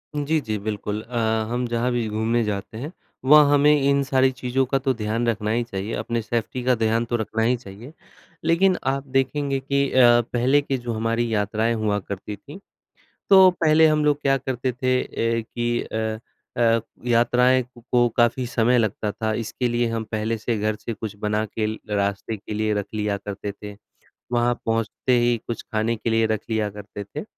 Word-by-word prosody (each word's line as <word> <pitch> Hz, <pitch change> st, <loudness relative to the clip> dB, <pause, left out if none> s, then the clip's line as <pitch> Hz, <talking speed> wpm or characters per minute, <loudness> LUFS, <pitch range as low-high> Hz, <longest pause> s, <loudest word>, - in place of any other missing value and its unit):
जी, 150 Hz, +2 st, +1 dB
जी, 110 Hz, -4 st, -3 dB
बिल्कुल 105 Hz, 0 st, -4 dB
अ, 120 Hz, +2 st, -6 dB, 0.3 s
हम 125 Hz, +1 st, -1 dB
जहाँ 120 Hz, +1 st, 0 dB
भी 120 Hz, -2 st, -1 dB
घूमने 110 Hz, +2 st, 0 dB
जाते 105 Hz, +1 st, -4 dB
हैं, 145 Hz, +7 st, -6 dB, 0.3 s
वहाँ 145 Hz, 0 st, +7 dB
हमें 145 Hz, +1 st, +5 dB
इन 140 Hz, 0 st, +3 dB
सारी 130 Hz, -1 st, +2 dB
चीज़ों 130 Hz, +1 st, -1 dB
का 135 Hz, +2 st, 0 dB
तो 135 Hz, 0 st, 0 dB
ध्यान 115 Hz, +1 st, -2 dB
रखना 105 Hz, -1 st, 0 dB
ही 120 Hz, +1 st, +1 dB
चाहिए, 100 Hz, -1 st, -5 dB
अपने 115 Hz, -1 st, -2 dB
सेफ्टी 120 Hz, +3 st, -3 dB
का 125 Hz, 0 st, +3 dB
ध्यान 115 Hz, +1 st, +1 dB
तो 120 Hz, -, -2 dB
रखना 110 Hz, 0 st, -1 dB
ही 125 Hz, +2 st, +3 dB
चाहिए। 115 Hz, +6 st, -12 dB, 0.5 s
लेकिन 180 Hz, +3 st, +3 dB
आप 135 Hz, +1 st, -1 dB
देखेंगे 135 Hz, +1 st, 0 dB
कि 140 Hz, 0 st, 0 dB
अ, 120 Hz, -2 st, +6 dB
पहले 130 Hz, +4 st, +3 dB
के 135 Hz, -2 st, -2 dB
जो 120 Hz, -1 st, -4 dB
हमारी 115 Hz, +1 st, -1 dB
यात्राएँ 110 Hz, +2 st, 0 dB
हुआ 105 Hz, -2 st, 0 dB
करती 100 Hz, +2 st, -6 dB
थीं, 145 Hz, -, -12 dB, 0.7 s
तो 190 Hz, -1 st, +8 dB
पहले 160 Hz, -2 st, +4 dB
हम 155 Hz, -1 st, +2 dB
लोग 145 Hz, -1 st, +2 dB
क्या 135 Hz, -1 st, +3 dB
करते 130 Hz, 0 st, -2 dB
थे 130 Hz, +1 st, 0 dB
ए 115 Hz, 0 st, -1 dB
कि 120 Hz, 0 st, 0 dB
अ 110 Hz, 0 st, -3 dB, 0.4 s
अ, 115 Hz, -1 st, +3 dB, 0.3 s
यात्राएँ 125 Hz, +2 st, +3 dB
कु 125 Hz, 0 st, -17 dB
को 120 Hz, -1 st, +4 dB
काफ़ी 120 Hz, +1 st, +2 dB
समय 120 Hz, +1 st, +2 dB
लगता 110 Hz, -1 st, -1 dB
था। 110 Hz, -1 st, -2 dB
इसके 125 Hz, +3 st, -3 dB
लिए 120 Hz, 0 st, +1 dB
हम 115 Hz, -1 st, -3 dB
पहले 110 Hz, +1 st, -1 dB
से 115 Hz, +1 st, -2 dB
घर 105 Hz, 0 st, -1 dB
से 115 Hz, -, -6 dB
कुछ 110 Hz, -2 st, -6 dB
बना 105 Hz, +1 st, -1 dB
के 110 Hz, +1 st, -2 dB
ल 110 Hz, +1 st, -3 dB
रास्ते 100 Hz, +2 st, -1 dB
के 105 Hz, +1 st, -8 dB
लिए 110 Hz, 0 st, 0 dB
रख 100 Hz, -1 st, -2 dB
लिया 105 Hz, -1 st, -1 dB
करते 100 Hz, 0 st, -6 dB
थे। 105 Hz, 0 st, -10 dB, 0.6 s
वहाँ 120 Hz, 0 st, +2 dB
पहुँचते 115 Hz, +2 st, -1 dB
ही 120 Hz, 0 st, +2 dB
कुछ 120 Hz, -, -4 dB
खाने 110 Hz, +1 st, 0 dB
के 115 Hz, -, -3 dB
लिए 115 Hz, 0 st, +3 dB
रख 110 Hz, -1 st, -1 dB
लिया 110 Hz, -2 st, 0 dB
करते 105 Hz, 0 st, -8 dB
थे। 145 Hz, +9 st, -7 dB
115 Hz, 195 wpm, -23 LUFS, 110-130 Hz, 0.7 s, तो